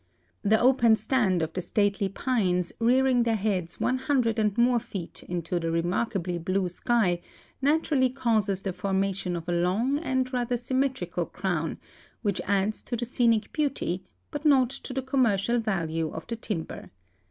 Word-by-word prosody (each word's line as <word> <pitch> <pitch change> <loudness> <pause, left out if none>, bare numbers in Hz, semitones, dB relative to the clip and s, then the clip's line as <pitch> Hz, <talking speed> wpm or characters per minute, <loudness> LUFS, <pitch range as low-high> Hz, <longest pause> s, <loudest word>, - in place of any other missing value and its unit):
The 215 +2 +3
open 240 -3 +5
stand 210 -6 +1
of 160 0 -4
the 185 - -2
stately 200 +1 0
pines 190 -5 0
rearing 250 +1 +3
their 230 -1 +2
heads 185 -5 -2
100 255 -3 +1
and 210 -1 +1
more 240 0 +4
feet 200 -7 -7
into 175 0 -3
the 165 -1 -2
remarkably 175 +1 -1
blue 185 +2 0
sky 180 -2 +1 0.4
naturally 285 -2 +2
causes 220 -7 0
the 190 - -2
formation 195 -2 -1
of 170 0 -6
a - - -1
long 195 +11 +1
and 260 -4 -1
rather 245 0 0
sym 255 +2 -2
metrical 265 -1 -1
crown - - -2 0.5
which 200 -4 0
adds 200 +2 0
to 240 - -4
the 240 - -2
scenic 230 -2 +1
beauty, 275 - -1 0.3
but 290 0 -5
not 265 -5 +4
to 270 - -7
the 265 0 -2
commercial 240 -4 +2
value 165 -7 -1
of 160 - -7
the 235 - -4
timber. 210 -7 -5
220 Hz, 160 wpm, -27 LUFS, 185-255 Hz, 0.5 s, open